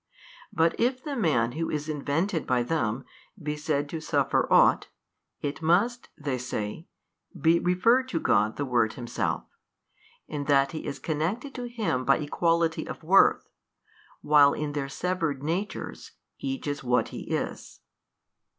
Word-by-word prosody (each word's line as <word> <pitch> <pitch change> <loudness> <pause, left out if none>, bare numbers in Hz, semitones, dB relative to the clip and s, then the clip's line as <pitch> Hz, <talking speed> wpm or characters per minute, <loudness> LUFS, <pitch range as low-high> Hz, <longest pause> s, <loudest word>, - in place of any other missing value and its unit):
But 165 +1 +1
if 255 +2 +1
the 295 -3 -4
man 140 - +2
who 165 +5 -3
is 150 0 -3
invented 155 +4 -1
by 125 -1 +2
them 120 -3 -1 0.3
be 150 -2 -3
said 150 -1 -1
to 160 0 -5
suffer - - +1
ought, - - +5 0.5
it 145 +2 -4
must 200 +10 +2
(they 140 -3 -3
say) 120 - -4 0.5
be 165 +1 +4
referred 230 +9 +3
to 165 - -1
God 105 -4 +2
the 145 - -2
Word 120 -4 +1
Himself, 120 -2 -2 0.8
in 145 -2 -4
that 140 -1 +3
he 155 - -6
is - - -4
connected 180 - -2
to 245 -1 -5
Him 215 - -1
by 135 +2 +4
equality 165 +2 0
of - - -7
worth, 190 +5 +4 0.7
while 145 -1 +6
in 150 -1 -3
their 140 -2 -3
severed 165 -3 -2
natures 180 +7 -4 0.3
each 270 -2 -4
is 145 -1 -3
what 125 0 +1
he - - -8
is. - - -4
155 Hz, 150 wpm, -27 LUFS, 140-180 Hz, 0.8 s, while